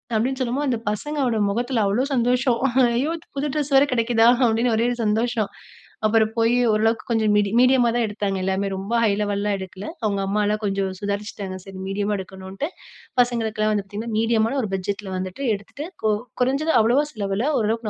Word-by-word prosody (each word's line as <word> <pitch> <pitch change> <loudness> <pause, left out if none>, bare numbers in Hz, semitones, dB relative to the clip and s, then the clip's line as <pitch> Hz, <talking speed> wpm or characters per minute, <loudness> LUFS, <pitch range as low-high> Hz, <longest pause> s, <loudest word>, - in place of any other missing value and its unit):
அப்டின்னு 255 +5 0
சொல்லும்போது 260 +3 0
அந்த 235 -3 0
பசங்களோட 255 +1 -1
முகத்தில 240 +1 0
அவ்வளோ 205 +6 +1
சந்தோஷம். 245 0 +2 0.4
"ஐயோ! 285 +7 0 0.2
புது 285 +2 -1
ட்ரெஸ் 295 -1 -1
வேற 270 - +7
கெடைக்கிதா 230 -1 +3 0.2
அப்டின்னு 230 +1 +1
ஒரே 230 - +2
ஒரு 245 - -2
சந்தோஷம்" 220 0 0 0.6
அப்புறம் 220 0 +3
போய் 230 +1 +3 0.2
ஓரளவுக்கு 225 +1 +1
கொஞ்சம் 220 -2 +2
மீடி 205 -1 +3
மீடியமா 255 -1 +5
தான் 235 -2 +2
எடுத்தாங்க 205 -2 -2
எல்லாமே 190 +1 0
ரொம்ப 195 +4 -5
ஹை 215 - +4
லெவல்லலாம் 205 0 0
எடுக்கல 190 +1 -8 0.2
அவங்க 200 -2 0
அம்மாலாம் 210 +1 0
கொஞ்சம் 195 -1 0
சுதாரிச்சுட்டாங்க. 200 -2 -4
சரி 195 -1 -10
மீடியமா 205 +1 -1
எடுக்கணுன்ட்டு 190 +7 -6 0.5
பசங்களுக்கெல்லாம் 220 -3 0
வந்து 205 -2 0
பார்த்தீங்கன்னா 215 +3 -5
மீடியமான 225 +3 +1
ஒரு 215 - -3
பட்ஜெட்ல 195 +1 -4
வந்துட்டு 185 +8 -5
எடுத்துட்டு, 245 +9 -8 0.2
கு 220 - +3 0.3
குறைஞ்சது 275 +6 +1
அவ்வளவா 250 +7 +3
செலவுல 205 +3 -1
ஓரளவுக்கு 220 +1 -1
220 Hz, 165 wpm, -23 LUFS, 200-245 Hz, 0.6 s, வேற